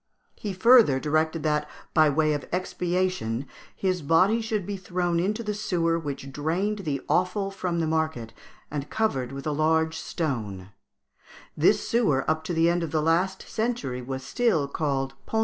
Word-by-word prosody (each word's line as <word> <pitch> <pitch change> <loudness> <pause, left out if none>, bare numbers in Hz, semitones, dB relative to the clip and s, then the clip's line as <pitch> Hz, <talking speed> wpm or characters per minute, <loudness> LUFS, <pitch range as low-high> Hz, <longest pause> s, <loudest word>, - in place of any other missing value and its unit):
He 205 - -5
further 195 - +6
directed 155 +2 0
that, 150 -1 0 0.2
by 155 -2 +5
way 155 +1 +2
of 145 -3 -4
expiation, 180 -8 -1 0.3
his 185 -2 -1
body 185 +10 +3
should 220 -4 -2
be 205 - -3
thrown 180 -2 -1
into 210 +6 -1
the 210 -1 -2
sewer 170 -5 0
which 140 -3 -6
drained 175 +9 -1
the 145 -8 -2
offal 195 +2 +1
from 185 -3 -2
the 165 - +1
market, 155 -8 -1 0.4
and 145 -1 -4
covered 135 - -1
with 135 0 -7
a 155 - 0
large 160 +2 +1
stone; 105 - -4 0.8
this 190 +7 +3
sewer 205 - +2
up 155 0 +1
to 175 - -2
the 165 +1 +4
end 175 +1 +2
of 165 - -2
the 155 - 0
last 175 +5 +1
century 225 - -2
was 130 +1 -5
still 180 - +1
called 140 -2 -1
Pont 225 - -2
Alais. - - +4
165 Hz, 170 wpm, -26 LUFS, 145-190 Hz, 0.8 s, further